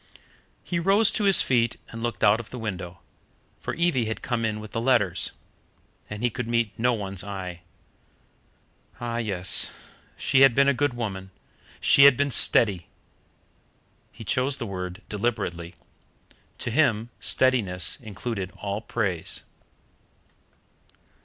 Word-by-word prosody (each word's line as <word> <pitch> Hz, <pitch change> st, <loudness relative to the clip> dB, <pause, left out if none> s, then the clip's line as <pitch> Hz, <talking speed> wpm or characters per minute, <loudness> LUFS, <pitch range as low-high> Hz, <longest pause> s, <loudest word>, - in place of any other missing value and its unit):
He 170 Hz, -, -2 dB
rose 195 Hz, +5 st, +4 dB
to 210 Hz, -, 0 dB
his 195 Hz, -1 st, +6 dB
feet 120 Hz, -3 st, +1 dB
and 115 Hz, -, -8 dB
looked 120 Hz, -1 st, -3 dB
out 105 Hz, +1 st, +5 dB
of 115 Hz, -, -9 dB
the 125 Hz, -, -8 dB
window, 95 Hz, -6 st, -6 dB, 0.6 s
for -, -, -5 dB
Evie 170 Hz, -9 st, +1 dB
had 110 Hz, 0 st, -5 dB
come 120 Hz, -2 st, -2 dB
in 110 Hz, -1 st, -2 dB
with 110 Hz, -1 st, -10 dB
the 115 Hz, -, -3 dB
letters, 110 Hz, -8 st, +1 dB, 0.8 s
and 105 Hz, +2 st, -6 dB
he 120 Hz, -, +1 dB
could 125 Hz, +1 st, -5 dB
meet 115 Hz, -2 st, 0 dB
no 125 Hz, +2 st, +1 dB
one's 100 Hz, -4 st, -4 dB
eye. 95 Hz, -3 st, -7 dB, 1.4 s
Ah 120 Hz, -1 st, -4 dB
yes 95 Hz, -6 st, 0 dB, 0.5 s
she 135 Hz, -, +2 dB
had 135 Hz, -4 st, +6 dB
been 140 Hz, 0 st, +4 dB
a 140 Hz, -, +4 dB
good 140 Hz, -1 st, -1 dB
woman 95 Hz, -5 st, -5 dB, 0.5 s
she 140 Hz, -, +6 dB
had 140 Hz, -3 st, +7 dB
been 140 Hz, 0 st, 0 dB
steady. 100 Hz, -6 st, +5 dB, 1.2 s
He -, -, -11 dB
chose 130 Hz, +5 st, 0 dB
the 120 Hz, -, -5 dB
word 90 Hz, 0 st, -6 dB
deliberately. 95 Hz, -6 st, -3 dB, 0.8 s
To -, -, -3 dB
him 115 Hz, -4 st, +1 dB
steadiness 105 Hz, -10 st, +2 dB
included 105 Hz, -3 st, -5 dB
all 100 Hz, +1 st, -4 dB
praise. 100 Hz, -8 st, -1 dB
115 Hz, 140 wpm, -25 LUFS, 100-125 Hz, 1.4 s, had